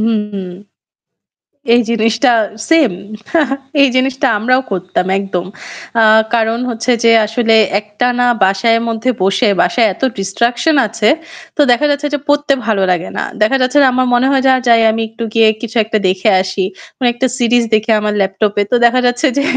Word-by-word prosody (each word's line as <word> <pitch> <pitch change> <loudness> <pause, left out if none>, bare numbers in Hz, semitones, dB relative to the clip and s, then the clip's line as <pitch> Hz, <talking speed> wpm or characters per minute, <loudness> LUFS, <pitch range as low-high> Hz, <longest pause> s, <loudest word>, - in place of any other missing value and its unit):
হুম। 210 -3 -2 1.3
এই 240 - +4
জিনিসটা 230 +2 +1 0.4
সেম। 320 - +3 0.9
এই 280 - +6
জিনিসটা 265 +1 0
আমরাও 255 +4 +1
করতাম, 185 0 -2
একদম। 190 -3 -4 0.5
অ্যা 225 - +4 0.3
কারণ 225 0 0
হচ্ছে 230 +2 -3
যে 230 - +5 0.2
আসলে 225 +1 0 0.3
একটানা 245 +4 -1 0.2
বাসায় 195 +4 +1
মধ্যে 230 +3 -1
বসে, 195 +4 +1
বাসায় 225 +6 +2
এত - - -20 0.2
ডিস্ট্রাকশন 240 +9 0
আছে। 215 0 -1 0.5
তো - - -1
দেখা 245 +5 +2
যাচ্ছে 285 +1 -1
যে - - 0
পড়তে 290 0 +1
ভালো 215 -4 0
লাগে 180 0 -2
না। - - -1 0.2
দেখা 245 +6 +2
যাচ্ছে 255 +3 +1
যে - - +5
আমার 255 0 0
মনে 245 +2 +2
হয় 270 -1 +1
যা 260 - +5
যাই 230 -1 +5
আমি 225 +1 -2
একটু 225 +1 -7
গিয়ে 225 -1 +4
কিছু 235 0 -7
একটা 220 0 -1
দেখে 185 +3 +1
আসি। 190 +1 -4 0.3
কোনো 255 - -2
একটা 250 +2 -1
সিরিজ 240 -1 +2
দেখি 220 +1 0
আমার 210 0 -2
ল্যাপটপে। 200 +1 -1
তো - - 0
দেখা 245 +2 +3
যাচ্ছে 245 +5 0
যে - - +1
230 Hz, 170 wpm, -14 LUFS, 210-250 Hz, 1.3 s, এই